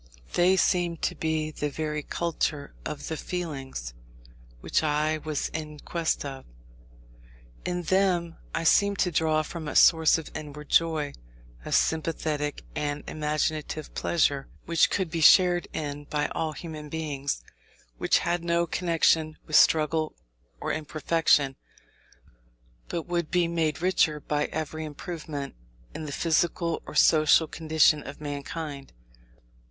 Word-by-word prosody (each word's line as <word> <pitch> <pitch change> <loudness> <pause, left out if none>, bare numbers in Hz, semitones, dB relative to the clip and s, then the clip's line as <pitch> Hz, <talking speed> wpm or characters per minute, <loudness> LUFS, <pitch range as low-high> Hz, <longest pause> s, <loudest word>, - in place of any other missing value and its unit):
They 180 +2 +4
seemed 175 -3 +1
to - - +1
be 160 -1 -1
the 150 -1 -3
very 150 +1 -3
culture 150 -2 -2
of 145 - -5
the 160 - -2
feelings, 135 - -5 0.7
which - - 0
I 155 0 +1
was 155 -1 -3
in 155 -1 -6
quest 165 -2 -2
of. 135 -1 -6 1.2
In 180 0 -2
them 175 -2 +1 0.2
I 165 - -1
seemed 200 +4 +4
to 180 - +1
draw 155 -1 +2
from 160 0 -7
a 145 - -4
source 160 -1 +6
of 160 - -8
inward 150 -1 -8
joy, 160 -3 +2 0.5
of - - 0
sympathetic 155 -2 0
and 145 0 -2
imaginative 155 0 -2
pleasure, 145 -4 +1 0.2
which 170 -1 +3
could 185 -5 -1
be 165 -1 -2
shared 175 +1 +6
in 145 -1 -4
by 150 0 -1
all 160 -1 -2
human 155 -2 -8
beings; 145 -3 -3 0.6
which - - +3
had 175 -1 0
no 170 0 +2
connection 165 -2 +1
with 155 - -2
struggle 155 0 +4 0.4
or - - -2
imperfection, 155 -2 +1 1.3
but 170 - -3
would 175 -2 -2
be 175 -1 +2
made 165 -1 -1
richer 170 -4 +2
by 150 0 -1
every 160 0 -4
improvement 150 -2 -6 0.4
in 155 - -6
the 145 - -5
physical 170 +2 0
or - - -8
social 155 +1 +5
condition 155 -1 +3
of 140 0 -9
mankind. 145 0 -6
155 Hz, 135 wpm, -27 LUFS, 150-170 Hz, 1.3 s, source